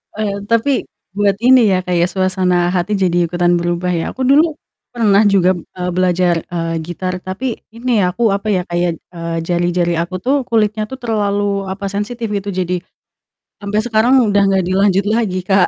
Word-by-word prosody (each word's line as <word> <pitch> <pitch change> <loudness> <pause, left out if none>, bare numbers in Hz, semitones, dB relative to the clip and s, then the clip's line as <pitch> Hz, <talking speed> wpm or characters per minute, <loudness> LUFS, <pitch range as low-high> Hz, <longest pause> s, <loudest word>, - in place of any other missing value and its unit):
Eee, 205 -2 -2
tapi 230 +4 +1 0.3
buat 200 -1 +2
ini 245 -5 +5
ya, 185 - +1
Kak, 180 -1 -2
ya, 170 - +3
suasana 185 -1 +1
hati 185 +3 -1
jadi 175 -3 +1
ikutan 175 +1 +1
berubah 175 +1 -1
ya? 170 -2 -2
Aku 260 - -7
dulu 295 +5 +4 0.4
pernah 210 -4 +3
juga, 190 -2 +4 0.3
eee, 180 0 -2
belajar, 180 -1 +2
eee, 165 -1 -3
gitar 180 +2 -4
tapi 220 +7 -4
ini, 235 -1 0
aku, 210 +5 +1
apa 200 +2 -3
ya, 190 -3 +2
kayak 175 -1 -1 0.5
jari-jari 175 0 0
aku 170 +2 -3
tuh 265 +6 +1
kulitnya 215 -1 +1
tuh 265 - -7
terlalu, 205 -3 -1
apa, 200 +1 -5
sensitif 225 +4 -3
gitu, 200 0 -3
jadi 180 -1 -1 0.9
sampai 205 +1 -1
sekarang 230 +2 +2 0.2
udah 205 0 +3
gak 190 -1 +2
dilanjut 195 +1 +2
lagi, 210 -5 0
Kak. 190 -2 +3
195 Hz, 170 wpm, -17 LUFS, 180-215 Hz, 0.9 s, ini